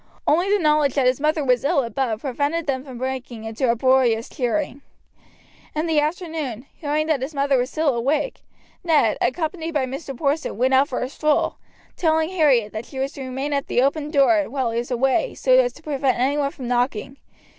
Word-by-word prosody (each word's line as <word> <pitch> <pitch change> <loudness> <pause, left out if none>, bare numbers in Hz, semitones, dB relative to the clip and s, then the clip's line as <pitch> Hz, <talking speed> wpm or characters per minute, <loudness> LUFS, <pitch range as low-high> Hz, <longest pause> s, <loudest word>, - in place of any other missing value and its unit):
Only 350 +6 +2
the 410 - +4
knowledge 300 -5 +2
that 275 -3 +2
his 255 +1 +2
mother 305 0 +1
was 250 -2 +2
ill 280 -1 +2
above 230 -1 -2
prevented 290 +5 -1
them 265 -3 -1
from 260 -3 -9
breaking 255 -3 -5
into 225 +3 -1
uproarious 240 -1 +2
cheering. 280 +1 -2 0.9
In 310 +2 0
the 320 -2 +2
afternoon, 305 - -3
hearing 305 0 -1
that 310 -4 0
his 285 +4 -5
mother 280 0 +2
was 250 0 +1
still 315 0 0
awake, 280 - -1 0.4
Ned, 305 -10 +3
accompanied 320 +5 -2
by 275 -3 +2
Mr. 270 0 -6
Porson, 290 -4 -1
went 260 +3 +2
out 270 +2 +5
for 250 - -3
a 250 - -1
stroll, 305 +2 0 0.4
telling 320 -1 +1
Harriet 280 - +2
that 220 +1 -6
she 270 - -10
was 270 +1 -1
to 275 - -9
remain 265 +3 -3
at 280 -1 -1
the 245 - +2
open 290 +2 0
door 300 +1 +3
while 255 -2 -1
he 230 - -1
was 240 - -5
away, 265 - +1
so - - -1
as - - +5
to - - -17
prevent 275 -3 0
any 265 +4 +1
one 285 -1 0
from 260 -3 -8
knocking. 245 +1 -1
275 Hz, 200 wpm, -22 LUFS, 255-305 Hz, 0.9 s, out